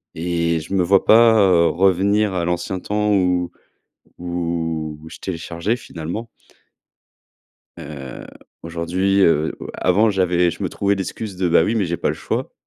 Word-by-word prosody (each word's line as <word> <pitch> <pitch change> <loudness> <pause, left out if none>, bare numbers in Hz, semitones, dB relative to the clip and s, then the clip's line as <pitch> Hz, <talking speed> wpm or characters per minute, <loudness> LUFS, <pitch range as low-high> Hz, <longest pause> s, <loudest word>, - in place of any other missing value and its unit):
et 85 0 -1
je 80 +5 -8
me 95 -2 +2
vois 95 +2 +3
pas, 115 0 +6
heu, 90 -4 +4
revenir 95 +4 +2
à 90 -2 -1
l'ancien 90 +2 -2
temps 105 +2 -1
où 90 -2 +1 0.7
où 85 -3 -3
je - - -11
téléchargeais 85 +4 -3
finalement 90 +4 -7 1.5
heu, 70 -3 -9 0.4
aujourd'hui, 85 +4 0
heu 80 -4 +2
heu, - - -7
avant 105 +5 +2
j'avais 90 -3 +2
je - - -8
me - - -1
trouvais 100 0 0
l'excuse 95 +1 -5
de 90 -1 0
«Bah, 85 - +4
oui, 110 - 0
mais 110 -4 +1
j'ai 85 0 -2
pas - - -1
le - - -1
choix». - - -4
90 Hz, 155 wpm, -20 LUFS, 85-100 Hz, 1.5 s, pas